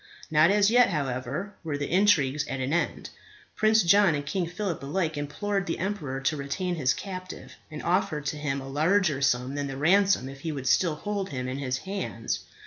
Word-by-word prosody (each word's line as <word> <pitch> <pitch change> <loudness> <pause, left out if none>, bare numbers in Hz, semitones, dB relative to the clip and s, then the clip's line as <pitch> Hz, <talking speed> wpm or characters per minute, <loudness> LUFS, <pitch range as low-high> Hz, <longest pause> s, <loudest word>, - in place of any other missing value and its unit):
Not 155 +2 +5
as 205 +1 +4
yet, 245 -1 +6
however, 140 +4 -3
were 155 -3 -2
the 145 - -4
intrigues 155 -7 +3
at 135 - -4
an 130 +3 -1
end. 170 - -1 0.4
Prince 220 0 +4
John 195 -1 +5
and 145 0 -4
King 175 +3 -1
Phillip 180 -1 -3
alike 155 +3 -1
implored 195 +8 -2
the 165 - -2
emperor 170 -9 -3
to 135 +3 0
retain 150 +6 -3
his 135 -6 +1
captive, 185 -2 -8 0.2
and 155 -2 -7
offered 175 -4 0
to 150 - -2
him 140 -2 -2
a 135 - -8
larger 155 +1 +2
sum 125 -1 +1
than 145 0 -2
the 135 -1 -5
ransom 185 0 +3
if 135 0 -9
he 160 +3 -4
would 135 -3 -5
still 160 +5 +3
hold 200 +3 -3
him 125 -3 -4
in 130 +2 -4
his 130 -2 -1
hands. 190 - -4
155 Hz, 200 wpm, -27 LUFS, 140-195 Hz, 0.4 s, yet